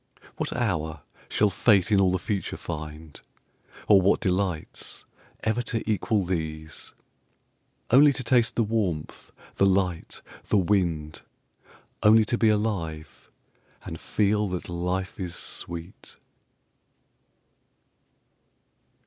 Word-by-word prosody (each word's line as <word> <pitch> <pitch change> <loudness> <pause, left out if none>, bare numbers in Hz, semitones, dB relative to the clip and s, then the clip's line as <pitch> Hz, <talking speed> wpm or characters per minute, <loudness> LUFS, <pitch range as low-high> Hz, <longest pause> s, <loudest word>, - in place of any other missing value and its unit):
What - - -2
hour 80 - -2 0.3
shall 105 -1 +2
Fate 100 -1 +3
in 100 -2 +5
all 95 -1 +4
the 95 - +1
future 100 +1 -3
find, 75 -2 -7 0.7
Or 100 -2 +7
what 95 - +3
delights, 90 -3 -2 0.4
ever 110 +2 +1
to 115 -2 -3
equal 105 -1 +1
these: 80 -3 -4 1.0
Only 140 +4 +7
to 125 - -4
taste 120 -1 +2
the 115 - +3
warmth, 100 -8 -2 0.3
the 100 - +4
light, 95 -3 -1 0.2
the - - +3
wind, 85 -6 0 0.8
Only 110 +1 +6
to 120 - 0
be 115 - +4
alive, 90 -8 -2 0.6
and 80 - -6
feel 105 0 +1
that 90 -2 -5
life 90 +4 -3
is 90 -3 -4
sweet? 85 +1 -6
95 Hz, 110 wpm, -26 LUFS, 85-105 Hz, 1.0 s, Or